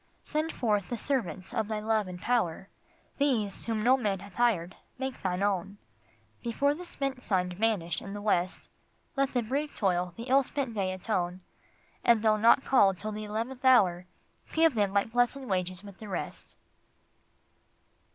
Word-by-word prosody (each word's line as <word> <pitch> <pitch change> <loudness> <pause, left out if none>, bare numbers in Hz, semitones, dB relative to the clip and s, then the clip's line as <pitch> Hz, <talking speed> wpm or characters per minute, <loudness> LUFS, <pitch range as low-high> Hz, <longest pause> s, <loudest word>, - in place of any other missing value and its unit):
Send 310 +2 -1
forth 210 -5 0
the 240 - -2
servants 230 - -2
of 220 -3 0
Thy 215 -1 -2
love 215 -1 +1
and 180 -1 -7
power, 195 -5 0 0.5
These 230 -9 0
whom 220 -2 -1
no 255 +3 +6
man 205 -6 0
hath 200 +1 -12
hired 190 -6 +1 0.2
make 265 0 -4
Thine 185 0 -1
own. 200 0 -1 0.6
Before 280 +5 +1
the 355 +4 -8
spent 275 -6 -3
sun 185 -5 0
vanish 180 -4 0
in 195 - -7
the 205 - -5
west 185 -3 0 0.5
Let 275 0 +1
the 245 - +2
brief 285 +6 -2
toil 180 -3 0
the 230 - -5
ill 265 +3 +4
spent 270 -2 -3
day 195 -3 -1
atone, 185 -2 -2 0.6
And 230 -2 +4
though 215 -1 +4
not 230 +5 +5
called 195 -8 +4
till 215 +3 -4
the 215 0 -5
eleventh 230 +5 -4
hour, 185 -9 +5 0.4
Give 325 -1 +4
them 205 -4 +1
like 200 +2 +1
blessed 245 +2 +2
wages 185 -5 -2
with 200 -2 -12
the 215 - -8
rest. - - -5
215 Hz, 170 wpm, -29 LUFS, 190-250 Hz, 0.6 s, no